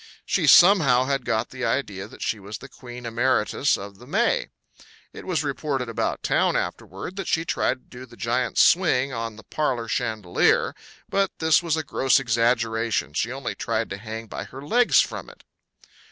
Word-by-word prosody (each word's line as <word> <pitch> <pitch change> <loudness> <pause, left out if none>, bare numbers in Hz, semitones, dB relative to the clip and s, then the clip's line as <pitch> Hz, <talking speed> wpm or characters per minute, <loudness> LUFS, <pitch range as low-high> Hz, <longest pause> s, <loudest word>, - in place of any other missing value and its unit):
She - - +1
somehow 160 -10 +7
had 135 -2 -1
got 110 -1 -1
the 130 0 -6
idea 100 -7 -2
that - - -9
she 110 - -1
was 100 +2 -7
the 135 - -11
queen 125 -2 -11
emeritus 120 +2 +1
of 100 0 -10
the 125 - -14
May. 235 - +1 0.6
It - - -10
was 175 -4 0
reported 140 -3 -2
about 115 - -2
town - - +2
afterward 95 - -5
that 195 - -4
she 165 +1 0
tried 130 - 0
to 125 - -15
do 130 - -8
the 120 0 -16
giant 120 +2 -1
swing 140 -7 +4
on 115 -1 -4
the 110 - -13
parlor 125 -5 -2
chandelier. 110 -7 +1 0.3
But 195 -1 +1
this 160 0 +3
was 165 -2 0
a 160 - -1
gross 135 -2 +2
exaggeration; 115 - 0
she 115 +9 -1
only 135 -1 -4
tried 115 -1 -2
to 95 - -4
hang 110 +2 -7
by - - -6
her 135 +2 -10
legs 240 +9 +4
from - - -5
it. - - -17
125 Hz, 180 wpm, -24 LUFS, 115-145 Hz, 0.6 s, somehow